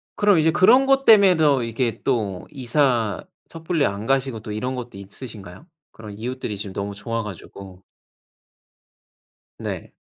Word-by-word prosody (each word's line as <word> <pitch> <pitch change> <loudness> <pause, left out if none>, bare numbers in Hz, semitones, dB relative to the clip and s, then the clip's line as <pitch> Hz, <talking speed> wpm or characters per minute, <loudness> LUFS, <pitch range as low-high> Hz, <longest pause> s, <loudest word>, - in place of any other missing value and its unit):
그럼, 205 -4 +4
이제 160 +1 +3
그런 220 +10 +5
것 270 0 +3
때문에 200 -4 +7
더 145 -5 +3
이게 115 0 -2
또 105 -8 -2
이사 125 -5 0 0.3
섣불리 165 -1 -1
안 100 +2 -3
가시고 135 -2 0
또 110 0 -8
이런 125 +5 -3
것도 120 -5 -8
있으신가요? 100 - -10 0.2
그런 105 -2 -11
이웃들이 120 -2 -5
지금 100 -1 -7
너무 100 +1 -4
좋아 115 +3 -3
가지고. 95 -1 -11 1.8
네. - - -6
120 Hz, 295 characters per minute, -22 LUFS, 105-150 Hz, 1.8 s, 때문에